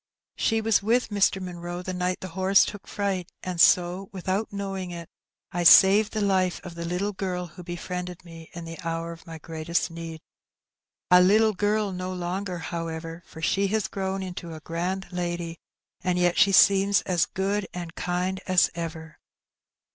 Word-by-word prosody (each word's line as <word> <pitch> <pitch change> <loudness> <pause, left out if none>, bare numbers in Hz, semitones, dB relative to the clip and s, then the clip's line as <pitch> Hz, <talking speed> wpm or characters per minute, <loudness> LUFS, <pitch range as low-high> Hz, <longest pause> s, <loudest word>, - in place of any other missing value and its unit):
She 225 -1 +1
was 220 -2 +3
with 230 +4 +1
Mr. 200 -2 +2
Munroe 175 -1 -6
the 185 - -4
night 180 0 -2
the 185 - -6
horse 190 +2 +4
took 205 - -8
fright, 195 -3 -2
and 180 -2 -1
so 180 +2 +4
without 190 +3 -2
knowing 195 -2 -4
it 170 -1 -7 0.4
I 175 - -2
saved 195 +5 +7
the 215 - -1
life 190 -3 +1
of 180 - -8
the 170 0 -6
little 180 +4 -2
girl 185 -2 -3
who 175 +1 -12
befriended 180 +1 -6
me 165 -1 -12
in 170 -1 -7
the 165 0 -8
hour 165 0 -3
of 165 0 -12
my 165 -1 -7
greatest 165 +2 -2
need. 165 -1 -7 0.9
A 180 0 +8
little 215 +4 +5
girl 205 +1 0
no 185 0 -4
longer, 180 +1 -3
however, 165 0 -5
for 160 - -11
she 195 +3 +2
has 215 +1 0
grown 190 0 -3
into 175 -3 -7
a - - -8
grand 180 +4 -3
lady, 175 -1 -3 0.4
and 180 -1 +1
yet 175 -1 +2
she 200 - +5
seems 195 +1 +5
as 180 -2 +1
good 195 +1 -1
and 175 -2 -6
kind 180 +2 -2
as 185 -1 +4
ever." 160 -2 -7
180 Hz, 175 wpm, -26 LUFS, 170-195 Hz, 0.9 s, A